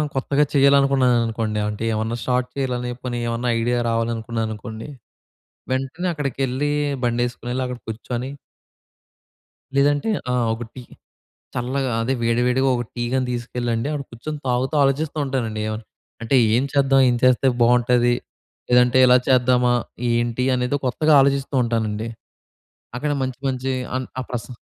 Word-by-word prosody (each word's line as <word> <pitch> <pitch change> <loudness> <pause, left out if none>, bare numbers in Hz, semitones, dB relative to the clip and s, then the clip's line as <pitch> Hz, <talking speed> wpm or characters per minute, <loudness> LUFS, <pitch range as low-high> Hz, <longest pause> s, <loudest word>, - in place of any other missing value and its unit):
కొత్తగా 140 +2 +2
చేయాలనుకున్నాననుకోండి 125 -6 +3
ఆంటేమన్నా 110 +2 -2
షార్ట్ 125 0 0
చేయాలని 125 -2 -2
జెప్పని 120 -1 -5
ఏమన్నా 120 +1 -1
ఐడియా 120 +1 +1
రావాలనుకున్నాననుకోండి. 115 0 -3 0.8
వెంటనే 135 +8 -2
అక్కడికెళ్ళి 140 0 -1 0.3
బండేసుకొనెళ్లి, 120 +1 -1
అక్కడ 125 -1 -6
కూర్చొని 120 +3 -4 1.5
లేదంటే 145 +6 +2 0.2
ఆహ్, 125 -2 +1
ఒక 115 +2 -5
టీ. 125 - -8 0.7
చల్లగా 130 +1 -1
అదే! 130 +4 0
వేడి 115 +1 +2
వేడిగా 130 +2 +2
ఒక 120 - -2
టీ 120 - -2
గాని 130 -1 +1
తీసుకెళ్ళండి, 120 0 -2
అక్కడ 145 -2 -3
కూర్చొని 150 +6 -6
తాగుతా 125 +4 0
ఆలోచిస్తూ 145 +3 0
ఉంటానండి 115 -5 -2
ఏమన్నా, 110 +1 -5 0.4
అంటే 115 +4 +1 0.2
ఏం 125 - +2
చేద్దాం, 135 -1 +4
ఏం 120 - +2
చేస్తే 130 +1 +4
బాగుంటది, 120 0 +4 0.6
లేదంటే 125 +1 +4
ఇలా 125 0 +6
చేద్దామా, 125 -1 +4 0.4
ఏంటి 120 +1 0
అనేది 125 +3 0
కొత్తగా 155 +5 +2
ఆలోచిస్తూ 140 0 +1
ఉంటానండి. 110 -1 -2 0.9
అక్కడ 145 +4 -1
మంచి 130 -1 -3
మంచి 130 0 -2 0.2
అన్ 130 0 -3
ఆ - - -2
ప్రశా 120 0 -5
125 Hz, 125 wpm, -22 LUFS, 115-135 Hz, 1.5 s, ఇలా